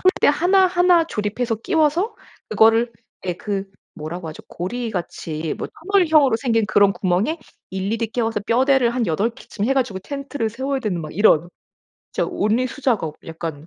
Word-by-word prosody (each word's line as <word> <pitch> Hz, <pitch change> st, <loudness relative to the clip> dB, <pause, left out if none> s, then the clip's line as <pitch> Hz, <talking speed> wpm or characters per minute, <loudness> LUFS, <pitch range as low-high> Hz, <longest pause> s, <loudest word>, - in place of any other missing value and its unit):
폴대 370 Hz, +1 st, +3 dB
1, 360 Hz, +6 st, +4 dB
1 355 Hz, -1 st, +4 dB
조립해서 225 Hz, -2 st, -2 dB
끼워서 330 Hz, -, +1 dB, 0.3 s
그거를 225 Hz, +2 st, +4 dB, 0.3 s
예 180 Hz, -, +1 dB
그 195 Hz, +2 st, -3 dB, 0.3 s
뭐라고 160 Hz, +3 st, -6 dB
하죠? 155 Hz, -, -9 dB
고리같이 175 Hz, -6 st, -4 dB
뭐 -, -, -3 dB, 0.3 s
터널형으로 310 Hz, -, +5 dB
생긴 225 Hz, -3 st, +1 dB
그런 205 Hz, -2 st, +4 dB
구멍에 195 Hz, -, 0 dB, 0.3 s
일일이 205 Hz, +4 st, -2 dB
끼워서 225 Hz, -2 st, -1 dB
뼈대를 255 Hz, +3 st, +3 dB
한 240 Hz, -1 st, -1 dB
8 195 Hz, +8 st, +1 dB
개쯤 215 Hz, -2 st, -6 dB
해 270 Hz, -, +2 dB
가지고 240 Hz, -8 st, 0 dB
텐트를 275 Hz, -1 st, -4 dB
세워야 265 Hz, +4 st, -2 dB
되는 195 Hz, -8 st, -2 dB
막 155 Hz, -1 st, -8 dB
이런 175 Hz, -4 st, +4 dB, 0.6 s
진짜 -, -, -1 dB
온리 220 Hz, +5 st, +1 dB
수작업 230 Hz, -, -1 dB
약간 160 Hz, -2 st, -6 dB
225 Hz, 315 characters per minute, -21 LUFS, 190-275 Hz, 0.6 s, 터널형으로